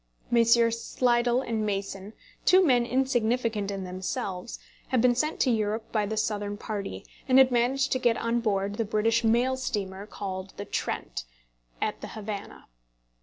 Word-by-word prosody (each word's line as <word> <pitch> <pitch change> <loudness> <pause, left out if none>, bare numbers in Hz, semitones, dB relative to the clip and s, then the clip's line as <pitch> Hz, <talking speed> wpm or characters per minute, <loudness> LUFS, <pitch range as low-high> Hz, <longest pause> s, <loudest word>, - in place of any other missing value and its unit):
Messrs. 230 0 +4
Slidell 240 0 +2
and 225 -3 -2
Mason, 195 0 -3 0.3
two 370 0 +6
men 245 -5 +3
insignificant 240 -5 0
in 195 -1 -4
themselves, 185 +3 -4 0.3
had 255 - +1
been 245 +1 +5
sent 305 +6 -1
to 255 - +3
Europe 220 0 -1
by 210 -2 +1
the 220 +1 -3
Southern 205 -1 -1
party, 205 -2 -5 0.2
and 260 -1 +5
had 265 -1 +7
managed 255 +3 +1
to 260 - +1
get 235 -2 +2
on 230 +1 0
board 200 -2 -1
the 230 - +1
British 225 +2 +1
mail 240 +3 +3
steamer 205 -6 -4
called 190 -2 -6
"The 205 - -5
Trent," - - -3 0.5
at - - -2
the - - -6
Havannah. 210 -2 -7
225 Hz, 160 wpm, -27 LUFS, 205-245 Hz, 0.5 s, had